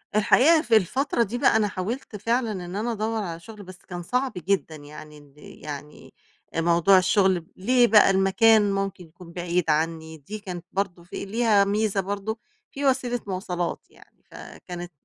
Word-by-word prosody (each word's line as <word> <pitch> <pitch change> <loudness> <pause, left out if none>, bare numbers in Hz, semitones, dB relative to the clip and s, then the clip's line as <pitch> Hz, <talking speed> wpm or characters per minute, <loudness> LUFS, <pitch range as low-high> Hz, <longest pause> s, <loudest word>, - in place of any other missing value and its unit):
الحقيقة 275 +9 +5
في 235 -7 +2
الفترة 240 - 0
دي 235 +3 -4
بقى، - - +3
أنا 215 -1 +3
حاولت 210 +5 -5
فعلًا 230 +2 -1
إن 180 -2 -6
أنا 225 +4 -2
أدوّر 220 0 -2
على 170 -2 -6
شغل 210 +3 -12
بس 185 -1 -12
كان 175 -1 -6
صعب 250 +6 -1
جدًا 180 -2 -1
يعني، 150 +1 -12
ال 145 -2 -19
يعني 150 0 -10 0.4
أ 165 - +1
موضوع 170 +3 +4
الشغل 185 0 +3
ب 165 - -19
ليه 240 +5 +3
بقى 210 -1 +6
المكان 205 +2 +4
ممكن 195 -2 -3
يكون 170 +1 -15
بعيد 175 -1 -1
عنّي، 160 +1 -1
دي 205 +9 -8
كانت 180 -4 -8
برضه 185 -3 -3
في 175 - -7
ليها 215 -1 +3
ميزة 205 0 0
برضه 200 +3 -4 0.3
في 280 +1 -4
وسيلة 255 -2 +1
مواصلات 180 -2 -3
يعني، - - -23
فكانت 175 -1 -9
195 Hz, 170 wpm, -24 LUFS, 175-220 Hz, 0.4 s, بقى